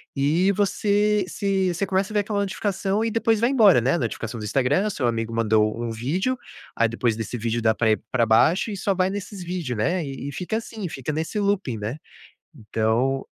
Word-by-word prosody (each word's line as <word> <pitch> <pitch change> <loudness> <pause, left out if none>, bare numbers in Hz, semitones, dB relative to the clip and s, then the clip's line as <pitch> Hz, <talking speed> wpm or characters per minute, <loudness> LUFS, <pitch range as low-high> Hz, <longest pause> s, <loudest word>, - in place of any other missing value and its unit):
e 160 +8 +2
você 205 +1 +1
se 190 -2 0
você 195 +4 -1
começa 190 +2 0
a - - -6
ver 210 - +2
aquela 205 0 -1
notificação 200 +1 -1
e - - +1
depois 225 -1 +2
vai 235 +2 +3
embora, 215 - +6
né, 130 +4 +1
a 170 - +1
notificação 115 -1 -4
do 110 - -6
Instagram, 135 - +1
o - - -1
seu 125 -8 -1
amigo 115 -1 -2
mandou 110 0 +1
um 115 -1 -3
vídeo 175 - -1 0.4
aí 115 -1 +2
depois 115 -1 0
desse 115 +2 -4
vídeo, 115 +1 -1
dá 110 0 +3
pra 110 0 +1
ir 110 - 0
pra 120 -3 +2
baixo 155 - +3
e 205 - -4
só 195 +1 0
vai 185 0 +1
nesses 200 -1 -6
vídeos, 170 -8 -3
né, 175 +10 0
e 135 0 -6
e - - -4
fica 190 +4 -2
assim, 220 -4 -6
fica 140 +2 -4
nesse 160 +7 -2
looping, 200 - 0
né, 110 +7 -4 0.6
então 115 +2 0
165 Hz, 215 wpm, -24 LUFS, -, 0.6 s, embora